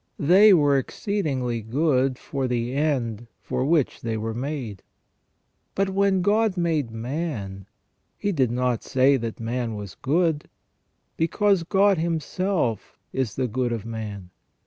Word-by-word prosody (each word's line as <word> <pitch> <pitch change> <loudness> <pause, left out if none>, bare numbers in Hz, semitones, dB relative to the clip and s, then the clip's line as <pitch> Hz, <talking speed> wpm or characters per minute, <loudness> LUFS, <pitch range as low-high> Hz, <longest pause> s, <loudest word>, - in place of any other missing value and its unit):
They 190 +8 +6
were 145 -6 +5
exceedingly 135 - -2
good 130 +2 +1
for 135 -1 -3
the 120 0 -1
end 125 -6 -1
for - - -2
which 150 -1 +1
they 115 -1 -2
were 110 +1 -3
made. 125 -5 -4 0.9
But 195 0 +1
when 195 -1 +2
God 210 0 +2
made 160 -7 0
man, 115 - -4 0.5
He 205 - -1
did 135 - +2
not 125 -1 0
say 135 +2 +3
that 115 -2 -5
man 115 0 -2
was 100 -4 -7
good, 160 +1 0 0.7
because 195 +4 +2
God 195 +1 +3
Himself 165 - -1 0.2
is 130 -6 -2
the 130 -1 0
good 125 +1 -1
of 115 -3 -3
man. 105 -5 -6
135 Hz, 135 wpm, -24 LUFS, 115-170 Hz, 0.9 s, They